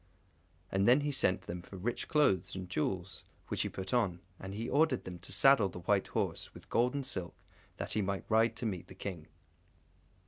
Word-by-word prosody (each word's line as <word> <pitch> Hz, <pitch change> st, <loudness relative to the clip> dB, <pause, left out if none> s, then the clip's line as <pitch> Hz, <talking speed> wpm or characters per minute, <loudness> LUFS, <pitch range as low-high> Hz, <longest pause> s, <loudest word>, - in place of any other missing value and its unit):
And 95 Hz, +1 st, +2 dB
then 125 Hz, +4 st, +6 dB
he 145 Hz, 0 st, -1 dB
sent 125 Hz, -9 st, +2 dB
them 85 Hz, +1 st, -6 dB
for 95 Hz, -, -11 dB
rich 115 Hz, +6 st, -3 dB
clothes, 95 Hz, -, +2 dB
and 95 Hz, -1 st, -5 dB
jewels, 90 Hz, +2 st, -2 dB, 0.3 s
which -, -, 0 dB
he -, -, -1 dB
put 95 Hz, 0 st, -5 dB
on; 100 Hz, -8 st, +1 dB, 0.2 s
and 95 Hz, +1 st, -6 dB
he 115 Hz, +3 st, -3 dB
ordered 145 Hz, -3 st, +2 dB
them 90 Hz, -1 st, -7 dB
to -, -, -8 dB
saddle 135 Hz, -8 st, +6 dB
the 90 Hz, -, -8 dB
white -, -, +2 dB
horse, -, -, -3 dB
with -, -, -13 dB
gold 125 Hz, +3 st, +2 dB
and 140 Hz, -2 st, -2 dB
silk, 90 Hz, -9 st, -2 dB, 0.4 s
that -, -, -4 dB
he 105 Hz, -, +1 dB
might 100 Hz, 0 st, -2 dB
ride 115 Hz, +1 st, +3 dB
to 120 Hz, -, -4 dB
meet 95 Hz, -6 st, -3 dB
the -, -, -12 dB
King. 85 Hz, -6 st, -6 dB
100 Hz, 205 wpm, -33 LUFS, 90-120 Hz, 0.4 s, then